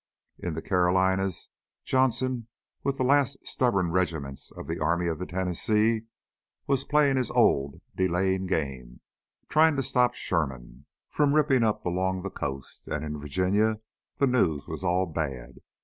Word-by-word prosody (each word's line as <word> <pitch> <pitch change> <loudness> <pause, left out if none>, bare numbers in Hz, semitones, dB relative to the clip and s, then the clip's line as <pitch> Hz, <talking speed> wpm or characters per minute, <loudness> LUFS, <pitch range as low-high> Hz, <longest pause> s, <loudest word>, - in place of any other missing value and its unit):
In 85 -3 -4
the 80 - -5
Carolinas, 95 0 +1 0.4
Johnston, 130 -2 +1 0.4
with 140 -1 -1
the - - 0
last 140 0 +3
stubborn 95 -9 +1
regiments 80 -7 -2
of - - -7
the - - -4
Army 85 +2 +1
of 80 -2 -2
the 90 - -4
Tennessee, 105 +5 0 0.6
was 135 -1 +1
playing 145 -2 +3
his 125 -3 0
old 70 0 +2
delaying 95 +1 +1
game, 65 -8 -3 0.5
trying 160 0 +4
to 135 - 0
stop 125 0 +2
Sherman 65 - -3 0.2
from 145 -1 +2
ripping 145 -4 +3
up 105 -1 0
along 95 +1 -1
the 100 - -4
coast. 70 -2 -6
And 75 +1 -3
in 75 0 -5
Virginia 95 +9 +1 0.4
the 140 - +3
news 95 - +1
was - - -6
all 90 +1 +2
bad. 75 -7 -5
95 Hz, 150 wpm, -27 LUFS, 80-125 Hz, 0.6 s, trying